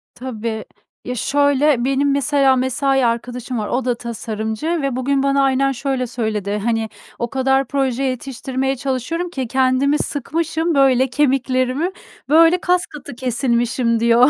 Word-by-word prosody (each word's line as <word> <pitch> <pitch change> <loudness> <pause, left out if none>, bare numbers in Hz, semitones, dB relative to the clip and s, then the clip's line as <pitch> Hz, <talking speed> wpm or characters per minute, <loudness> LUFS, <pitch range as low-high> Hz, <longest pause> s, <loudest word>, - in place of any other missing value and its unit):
Tabii. 230 -3 -5 0.4
Ya, 250 - -3
şöyle: 285 0 +2
Benim 275 +1 +2
mesela 275 -1 +3
mesai 260 +1 +1
arkadaşım 245 +1 -2
var, 210 - -3
o 250 0 -1
da 245 -2 +1
tasarımcı 220 +2 -4
ve 275 -3 -1
bugün 270 +1 0
bana 275 0 +2
aynen 270 0 +2
şöyle 265 -1 -2
söyledi: 215 -4 -2
"Hani, 225 -1 0 0.3
o 235 - -2
kadar 265 +1 +1
proje 270 -2 -1
yetiştirmeye 265 +1 -2
çalışıyorum 275 +7 -3
ki 265 -7 -4
kendimi 260 +3 +2
sıkmışım, 320 +3 -1
böyle 265 -2 +4
kemiklerimi, 265 +3 +1 0.4
böyle 330 +3 +6
kaskatı 355 -8 -2
kesilmişim" 240 -1 0
diyor. 235 +3 +5
260 Hz, 135 wpm, -19 LUFS, 240-275 Hz, 0.4 s, böyle